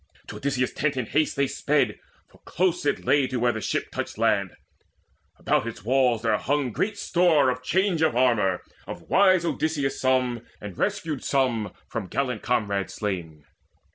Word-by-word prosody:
To - - -7
Odysseus' 130 -2 -1
tent 145 -2 -1
in 125 - -1
haste 155 +6 0
They 140 0 +2
sped, - - 0 0.3
for - - -23
close 175 -2 -1
it - - -1
lay 145 -2 +3
to 130 -1 -3
where 120 +1 +3
the 110 - -5
ship - - -2
Touched - - -5
land. - - +1 0.8
About - - 0
its 115 - -7
walls 125 -2 +2
was 110 -2 +1
hung 140 -2 0
great 205 - -2
store 170 -9 +3
Of 125 0 -5
change 185 +4 +1
of 160 -6 +2
armour, 115 -7 +2 0.2
of - - -9
wise 185 -3 +5
Odysseus 155 -4 -1
some, 130 -2 +1 0.2
And 105 -3 -8
rescued 150 - -2
some 120 -7 0 0.2
from 110 -5 -5
gallant 125 0 -2
comrades 100 -5 -1
slain. 85 -7 -4
130 Hz, 170 wpm, -25 LUFS, 115-150 Hz, 0.8 s, wise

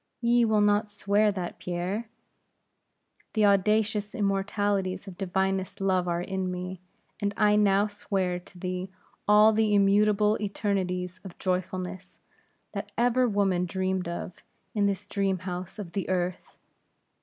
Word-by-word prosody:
Ye 235 0 +3
will 215 -2 +3
not 205 +1 +3
swear 205 +1 +2
that, 185 -3 -5
Pierre?" 185 +6 -3 1.2
"The 215 -2 +3
audacious 210 +2 +2
immortalities 200 -2 0
of 190 - -8
divinest 190 0 -1
love 185 -2 +1
are 170 0 0
in 190 0 -2
me; 180 0 -5 0.4
and 200 -1 -1
I 210 -1 +4
now 205 -1 +4
swear 195 -3 -2
to 180 +1 -17
thee 185 +1 -4 0.4
all 210 +1 +7
the 215 -1 +2
immutable 210 +1 +4
eternities 185 -3 -2
of 190 -3 -10
joyfulness, 185 0 -3 0.5
that - - -5
ever 245 +1 +3
woman 195 -3 +1
dreamed 190 -1 -1
of, 170 +1 -6 0.3
in 205 -2 +2
this 195 -1 -2
dream 195 -2 0
house 180 +1 -6
of 195 -5 -7
the 195 +1 -3
earth. 180 -1 -2
195 Hz, 135 wpm, -27 LUFS, 185-210 Hz, 1.2 s, all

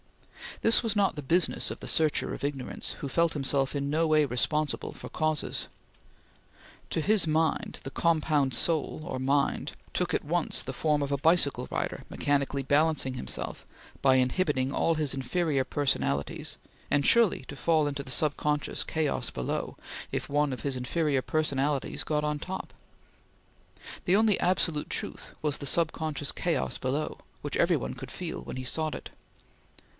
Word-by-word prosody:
This 225 +2 +5
was 225 -2 0
not 200 -4 +2
the 150 - -4
business 165 +5 +2
of - - -6
the - - -7
searcher 155 -2 +2
of - - -7
ignorance, 140 -2 -3
who 140 - -4
felt 165 +4 +2
himself 135 -1 +1
in 140 0 -1
no 160 +3 +2
way 155 -1 +4
responsible 145 +4 -1
for - - -9
causes. 155 -1 -1 1.2
To 160 - 0
his 210 +3 +3
mind, 160 +1 0
the 135 - -6
compound 155 -4 +2
IvXn 145 -1 0 0.2
took - - 0
at - - 0
once - - 0
the - - -5
form 150 -2 +1
of 140 0 -2
a 140 - +2
bicycle 160 0 +3
rider, - - -2
mechanically 140 -1 0
balancing 145 -1 +2
himself 125 - -4 0.4
by 135 -1 +5
inhibiting 130 0 +1
all 165 +3 +2
his 150 -3 0
inferior 135 +2 0
personalities, 130 - -1 0.3
and 145 -1 +2
sure 235 -3 +7
to 145 - -7
fall 155 0 +2
into 140 -1 -3
the 130 - -7
sub 150 +2 +1
conscious 150 -1 0
chaos 160 -2 -1
below, 65 - -3 0.3
if - - -3
one 145 0 +2
of 125 -3 -5
his 140 +1 -1
inferior 140 +2 0
personalities 145 -2 0
got 150 -1 0
on 150 0 -1
top. 190 +5 -6 1.3
The 180 - +4
only 215 -2 +4
absolute 165 -4 +1
truth - - -3
was 150 -1 +1
the 140 - -4
sub 165 +3 +2
conscious 150 -3 -2
chaos 65 0 -1
below, 140 +4 -2 0.2
which - - -3
every - - +4
one - - -4
could - - -8
feel - - -5
when - - -7
he 130 - -4
sought 155 +4 0
it. - - -8
150 Hz, 160 wpm, -29 LUFS, 135-160 Hz, 1.3 s, sure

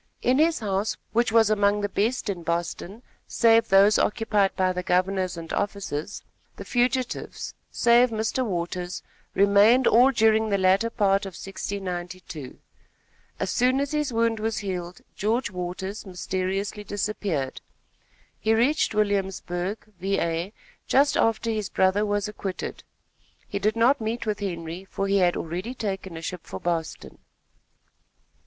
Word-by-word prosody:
In 255 +3 +3
his 320 -3 +3
house, 200 0 -1 0.2
which 235 0 +2
was 225 -1 +4
among 205 0 +2
the 205 - 0
best 225 +6 -1
in 190 -4 -3
Boston, 170 +6 -3 0.2
save 230 -1 +4
those 200 +2 +6
occupied 210 -3 +1
by 185 -1 +1
the 180 - -2
governors 185 0 0
and 165 -1 -7
officers, 200 -7 -3 0.3
the - - -9
fugitives, 250 0 -1 0.2
save 240 +1 +4
Mr. 220 +3 -1
Waters, 180 -3 -3 0.3
remained 205 +6 +5
all 245 +4 +6
during 220 -3 +3
the 200 - +2
latter 190 +4 +3
part 200 -3 +1
of 190 - -9
1692. 180 -6 -6 0.8
As - - -1
soon 255 +2 +2
as 280 0 -1
his 300 -3 0
wound 230 -1 +1
was 220 0 -1
healed, 180 -3 -5
George 220 +3 0
Waters, 185 +3 -5
mysteriously 190 +2 -3
disappeared. 200 -9 -3 0.8
He 220 +1 +2
reached 250 +1 +2
Williamsburg, 195 -2 -1
Va., 175 -1 -1 0.4
just 280 +2 +4
after 225 0 +1
his 215 -3 -2
brother 190 +3 +2
was 205 0 0
acquitted. 200 -3 -5 0.6
He 200 - -3
did 215 +2 +1
not 240 +4 +3
meet 225 +2 -2
with 210 -2 -1
Henry, 170 -2 -5
for 195 0 -3
he 200 0 +2
had 175 -1 +3
already 180 +10 -4
taken 195 -6 -4
a 165 - -8
ship 180 0 -5
for - - -6
Boston. 170 -2 -3
200 Hz, 140 wpm, -25 LUFS, 185-225 Hz, 0.8 s, those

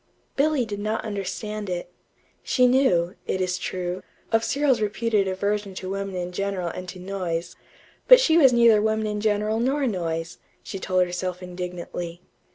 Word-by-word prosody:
Billy 285 -3 +2
did 205 -2 -5
not 215 +2 -2
understand 205 0 -4
it. 175 0 -4 0.5
She 250 - +3
knew, 245 -10 +3
it 190 - -1
is 185 0 -1
true, 180 0 -3 0.3
of 225 0 +3
Cyril's 275 -3 +2
reputed 210 -1 +1
aversion 200 +1 -2
to 185 0 -5
women 195 -1 -3
in 180 0 -3
general 190 -1 -2
and 180 +1 -7
to 185 - -8
noise; 180 -3 -4 0.5
but - - +10
she 330 -10 +3
was 280 -6 +7
neither 235 -3 +5
women 220 0 +1
in 210 -1 -2
general 215 +1 +1
nor 270 +4 +1
noise, 165 -6 -3 0.2
she 195 - -6
told 185 -1 +2
herself 180 +1 -4
indignantly. 175 -1 -6
200 Hz, 165 wpm, -24 LUFS, 180-220 Hz, 0.5 s, but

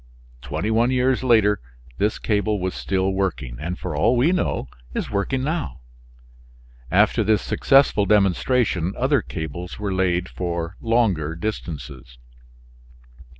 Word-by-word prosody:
Twenty 105 - -3
one 115 +2 +3
years 130 0 +1
later 110 -5 +3 0.4
this 105 +2 +1
cable 105 -1 0
was 95 0 -2
still 95 0 -1
working, 80 -11 -2
and 85 +3 -4
for 90 -4 -5
all 115 +12 +3
we 140 +8 +4
know 180 - -1 0.3
is - - -3
working 115 +6 -1
now. 150 - -3 1.1
After 105 +5 +3
this 105 0 +2
successful 135 -7 +3
demonstration 100 -1 +2
other 130 +1 +2
cables 85 0 -6
were 105 -2 -2
laid 90 -1 +1
for 85 -1 -4
longer 100 -10 +1
distances. 75 - -6
100 Hz, 125 wpm, -22 LUFS, 85-115 Hz, 1.1 s, we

